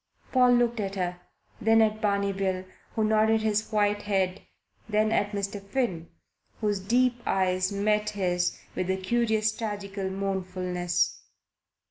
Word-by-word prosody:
Paul 250 -1 +5
looked 240 -1 +2
at 195 -1 -2
her, 180 -2 -2 0.4
then 225 +1 +5
at 215 -1 +2
Barney 200 -2 +1
Bill, 190 -1 -1 0.3
who 220 - +1
nodded 220 +1 +3
his 215 0 0
white 205 -1 +2
head, 195 -2 0 0.5
then 215 +1 +2
at 205 -2 +2
Mr. 200 -1 -3
Finn, 200 -6 -2 0.5
whose 210 -3 0
deep 240 +5 +2
eyes 185 0 +1
met 210 +1 +1
his 180 -4 0 0.2
with 185 - -2
a 190 - +1
curious 220 +1 +1
tragical 200 -3 -4
mournfulness. 185 -2 -1
205 Hz, 135 wpm, -27 LUFS, 190-220 Hz, 0.5 s, Paul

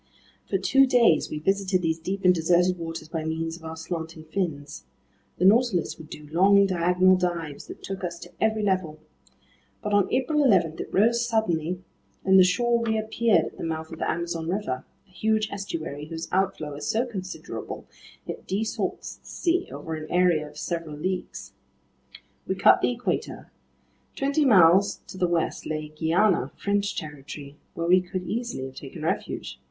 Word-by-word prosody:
For - - +2
two 270 0 +4
days 235 -10 +4
we 155 - -4
visited 190 +2 +1
these 160 0 0
deep 190 +4 -4
and 180 - +7
deserted 175 +2 +2
waters 165 -1 -6
by 160 0 -3
means 160 +1 -2
of 170 - -14
our 160 0 -6
slanting 160 -1 -5
fins. 155 -3 -4 0.5
The 180 - +1
Nautilus 210 -5 +3
would 155 -1 -11
do 150 0 -9
long, 200 +4 +5
diagonal 180 0 +4
dives 170 -5 -3
that - - -10
took 195 -1 -5
us 170 -1 -3
to - - -10
every 220 -1 +1
level. 185 -6 0 0.9
But 210 -1 -2
on 205 -2 +3
April 295 +4 +2
11 180 - +3
it - - -5
rose 235 +4 +3
suddenly, 180 -7 0 0.4
and 190 0 +6
the - - +9
shore 235 +6 +2
reappeared 220 -4 +2
at - - -9
the - - -5
mouth 160 0 -4
of 160 - -8
the - - -1
Amazon 170 -1 -2
River, 180 -10 -2 0.2
a - - -27
huge 215 +3 0
estuary 160 -7 -5
whose 165 0 -5
outflow 185 -6 0
is 145 +1 -6
so 225 +2 +1
considerable, 190 -6 -6 0.4
it - - -7
desalts 215 +3 -3
the - - -19
sea 355 +1 0
over 160 - -6
an 155 0 -6
area 175 -4 +3
of - - -14
several 165 -3 -4
leagues. 185 +4 -4 0.9
We - - 0
cut - - +5
the - - +3
Equator. - - -3 0.6
Twenty 280 +2 +1
miles 195 -3 +5
to 185 - -8
the 180 - +3
west 170 -1 -1
lay 155 -1 -3
Guiana, 165 -2 +2
French 200 0 -1
territory 145 -2 -7 0.2
where 170 - -2
we 180 +2 +5
could 180 0 -5
easily 235 - -3
have 135 - -8
taken - - -9
refuge. - - -3
180 Hz, 170 wpm, -26 LUFS, 160-205 Hz, 0.9 s, the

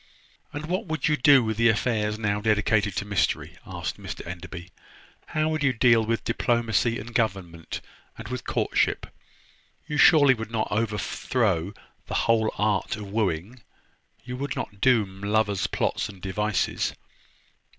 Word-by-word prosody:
"And 145 +1 -5
what 185 +5 -2
would 160 0 -1
you 155 - +3
do 140 -1 +6
with 110 -1 -2
the 115 0 +5
affairs 105 -1 0
now 105 -2 -1
dedicated 105 -2 +2
to 100 - -2
mystery?" 100 -2 -1
asked - - -5
Mr - - -7
Enderby. 90 +1 -8 0.6
"How 155 0 0
would 155 -1 -1
you 140 -2 +3
deal 115 -1 +4
with 115 +1 -1
diplomacy, 115 -1 +1
and 115 +3 -8
government, 90 -8 -2 0.4
and 115 - -8
with 125 +1 -5
courtship? - - 0 0.8
You 150 -1 -3
surely 145 -2 +7
would 115 -3 -6
not 115 -1 -1
overthrow 105 -3 0 0.3
the - - -4
whole 110 -1 +3
art 105 -2 0
of 105 -2 -8
wooing? 105 +2 -2 0.6
You 125 0 -5
would 140 +1 -3
not 100 -1 -6
doom 105 -7 +2
lovers' 105 -1 +1
plots - - -1
and 100 -2 -11
devices?" 95 -1 -1
110 Hz, 150 wpm, -26 LUFS, 100-125 Hz, 0.8 s, surely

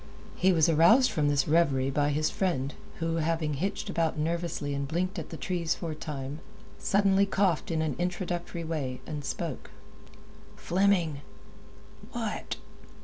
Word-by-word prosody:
He 190 - +4
was 160 -4 +4
aroused 170 - +6
from 150 -2 +1
this 140 -2 +2
reverie 140 -5 +3
by 145 +1 +2
his 155 +1 +1
friend, 150 -9 -1 0.2
who, 165 0 -1
having 160 -1 0
hitched 190 +8 -2
about 165 -2 0
nervously 160 -2 -1
and 140 0 -2
blinked 180 +5 -1
at 160 - -7
the 160 - -6
trees 175 -4 -1
for 165 -2 -4
a - - -5
time, 145 -2 -5 0.4
suddenly 200 0 +3
coughed 195 -5 +1
in 160 -1 0
an 150 -5 -1
introductory 175 -1 -2
way, 145 -6 -3
and 150 -2 -5
spoke. - - -4 0.9
"Fleming!" 175 -6 +1 0.9
"What?" - - -3
165 Hz, 145 wpm, -29 LUFS, 150-180 Hz, 0.9 s, aroused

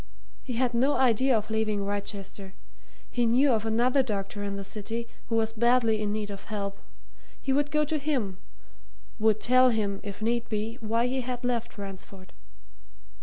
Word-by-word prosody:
He 255 - -5
had 245 +1 +1
no 265 +5 +3
idea 255 0 +4
of 215 0 -4
leaving 215 -2 0
Wrychester 200 -1 -5 0.6
he 240 -1 +2
knew 260 +4 +4
of 225 -1 +1
another 245 +5 +3
doctor 205 -4 -3
in 200 -1 -3
the 200 - -4
city 225 +4 -4 0.2
who 230 - -1
was 225 0 +1
badly 230 -1 +3
in 210 -1 0
need 210 -1 -2
of 200 - -8
help: 200 -2 -4 0.6
he 270 - 0
would 290 +1 +2
go 300 0 +2
to 305 +1 -1
him 250 -11 -1 0.8
would 215 0 +3
tell 255 +2 +5
him, 205 -4 0
if 200 -1 -7
need 235 +2 0
be, 220 +2 -2
why 230 +2 +1
he 260 +1 0
had 245 0 -4
left 235 -2 -1
Ransford. 195 -1 -8
225 Hz, 170 wpm, -28 LUFS, 205-250 Hz, 0.8 s, tell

